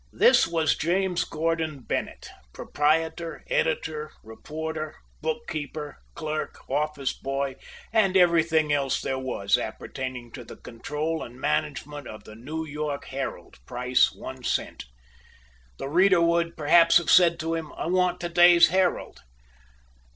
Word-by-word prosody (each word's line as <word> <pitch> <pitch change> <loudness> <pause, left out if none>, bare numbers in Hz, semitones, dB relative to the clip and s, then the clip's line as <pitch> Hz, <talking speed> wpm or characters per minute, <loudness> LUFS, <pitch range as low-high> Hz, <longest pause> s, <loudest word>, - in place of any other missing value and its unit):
This 480 - +5
was 165 -2 +1
James 180 +2 0
Gordon 160 -2 -2
Bennett, - - -4 0.3
proprietor, 160 +2 -1
editor, 160 - -1
reporter, 155 +7 -6 0.3
book 160 +10 -3
keeper, 150 -2 -5 0.2
clerk, 155 -1 -5
office 145 0 -1
boy, 135 0 -3 0.4
and 195 -4 +3
everything 165 -4 +3
else 135 -2 0
there 130 0 -3
was 100 -7 0
appertaining 125 -3 -6
to 120 - -9
the - - -11
control 150 +7 -4
and 120 +2 -9
management 150 -1 -2
of 110 - -10
the 110 - -12
New 150 +8 -6
York 150 -1 -4
"Herald," 135 +1 -6
price 125 0 +2
one - - -9
cent. - - -2 0.9
The - - -5
reader 185 +4 +4
would 170 0 +1
perhaps 165 +2 +6
have 170 -2 0
said 170 -2 +6
to 165 +1 -2
him, 165 -2 -4
"I - - -5
want 180 +1 +1
to 175 - -3
day's 175 0 +7
'Herald.'" 185 +1 0
155 Hz, 135 wpm, -26 LUFS, 140-170 Hz, 0.9 s, day's